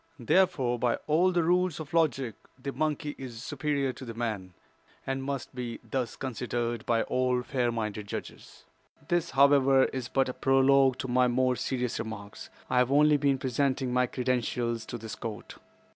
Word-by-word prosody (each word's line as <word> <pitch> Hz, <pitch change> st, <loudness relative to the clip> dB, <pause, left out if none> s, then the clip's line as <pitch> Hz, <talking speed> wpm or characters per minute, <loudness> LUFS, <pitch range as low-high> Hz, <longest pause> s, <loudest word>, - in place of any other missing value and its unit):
Therefore, 135 Hz, -3 st, +2 dB
by 120 Hz, -1 st, +2 dB
all 170 Hz, +5 st, +3 dB
the 175 Hz, -2 st, +2 dB
rules 180 Hz, 0 st, +2 dB
of 155 Hz, -1 st, -8 dB
logic, 135 Hz, -8 st, +1 dB, 0.3 s
the 140 Hz, +2 st, -4 dB
monkey 150 Hz, 0 st, -2 dB
is 120 Hz, -3 st, -7 dB
superior 140 Hz, -2 st, -1 dB
to -, -, -10 dB
the 115 Hz, -3 st, -7 dB
man, 105 Hz, -6 st, -4 dB, 0.5 s
and 135 Hz, 0 st, -2 dB
must 140 Hz, -1 st, -4 dB
be 120 Hz, -2 st, -5 dB
thus 125 Hz, -4 st, -3 dB
considered 120 Hz, -2 st, -3 dB
by 115 Hz, -1 st, +2 dB
all 125 Hz, -1 st, 0 dB
fair 125 Hz, -2 st, 0 dB
minded 105 Hz, -2 st, -4 dB
judges. -, -, -8 dB, 0.4 s
"This, 175 Hz, -1 st, +1 dB
however, 135 Hz, -1 st, +5 dB
is 130 Hz, -2 st, -2 dB
but 135 Hz, +1 st, +1 dB
a 130 Hz, -, -3 dB
prologue 135 Hz, 0 st, +4 dB
to -, -, -4 dB
my 125 Hz, 0 st, +3 dB
more 125 Hz, +1 st, +2 dB
serious 125 Hz, -1 st, -2 dB
remarks. 105 Hz, -2 st, -7 dB, 0.2 s
I 125 Hz, -, +2 dB
have 125 Hz, +1 st, +2 dB
only 150 Hz, +1 st, +5 dB
been 140 Hz, -1 st, +2 dB
presenting 130 Hz, 0 st, 0 dB
my 125 Hz, 0 st, +3 dB
credentials 120 Hz, -2 st, -1 dB
to 120 Hz, -, -5 dB
this 110 Hz, -1 st, -7 dB
court. 110 Hz, -3 st, -7 dB
130 Hz, 170 wpm, -29 LUFS, 120-140 Hz, 0.5 s, however